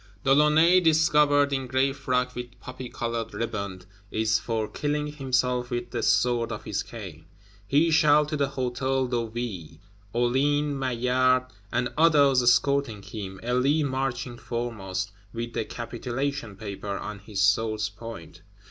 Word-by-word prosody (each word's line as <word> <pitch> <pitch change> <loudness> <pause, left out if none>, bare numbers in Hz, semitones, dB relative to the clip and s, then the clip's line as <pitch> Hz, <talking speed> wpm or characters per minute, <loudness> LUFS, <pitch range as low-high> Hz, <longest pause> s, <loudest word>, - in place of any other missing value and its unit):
De 135 - +4
Launay, 155 +5 +5
"discovered 150 -4 +4
in 135 -1 -2
gray 130 +2 +1
frock 125 -2 -1
with 125 -1 -8
poppy 130 -1 -8
colored 115 -1 -4
riband," 100 -5 -4 0.2
is 110 +1 +1
for 110 -2 -2
killing 150 +3 -2
himself 125 -4 -1
with 120 -1 -4
the 120 - -2
sword 120 0 +2
of 110 - -5
his 105 -1 -2
cane. 95 -9 -9 0.4
He 155 +7 +3
shall 150 -1 +5
to 150 +1 -3
the 140 -2 +1
Hôtel 130 0 -1
de 120 -2 -1
Ville; 105 -10 -5 0.3
Hulin, 140 +5 +1
Maillard, 130 0 +2 0.3
and 120 +1 0
others 145 -5 +5
escorting 120 -2 +2
him, 95 -3 -7
Elie 130 +6 +2
marching 130 -3 -2
foremost, 105 -5 -4 0.2
"with 115 0 -5
the 110 - -2
capitulation 120 0 -4
paper 100 0 -5
on 105 -1 -6
his 105 -1 -6
sword's 105 +1 +2
point." 100 -6 -10
125 Hz, 140 wpm, -26 LUFS, 110-140 Hz, 0.4 s, Launay